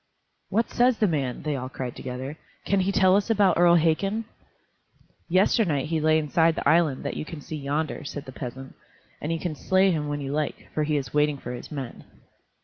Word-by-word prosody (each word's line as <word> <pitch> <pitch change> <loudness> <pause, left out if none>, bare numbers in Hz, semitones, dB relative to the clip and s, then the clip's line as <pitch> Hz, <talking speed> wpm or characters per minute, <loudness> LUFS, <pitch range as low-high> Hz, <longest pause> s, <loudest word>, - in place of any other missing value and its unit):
"What 225 +3 0
says 245 -1 +3
the 215 - +3
man?" 140 -7 -2
they 150 -2 -1
all 130 -1 -4
cried, 125 -2 -5
together; 130 +3 -6 0.3
"can 200 - +2
he 190 +1 +1
tell 190 -1 +4
us 205 +3 +1
about 200 -6 +3
Earl 175 -1 +6
Hakon?" 195 +7 +1 1.0
"Yesternight 175 - +2
he 165 -1 +1
lay 155 0 +4
inside 160 +2 +2
the - - -2
island 160 -5 +3
that - - -3
you - - -3
can 160 0 -8
see 155 +2 -6
yonder," 150 +2 -2
said 145 0 -6
the 130 - -8
peasant; 130 +1 -7 0.5
"and 150 - -2
you 165 - 0
can 175 -2 -3
slay 190 +5 +3
him 150 -3 -1
when 145 0 -2
you 140 -1 -4
like, 150 +1 -3
for 155 - 0
he 150 0 +1
is 130 -4 -4
waiting 150 -1 +2
for 125 -2 -7
his 120 - -8
men." 135 -5 -6
155 Hz, 210 wpm, -26 LUFS, 140-180 Hz, 1.0 s, Earl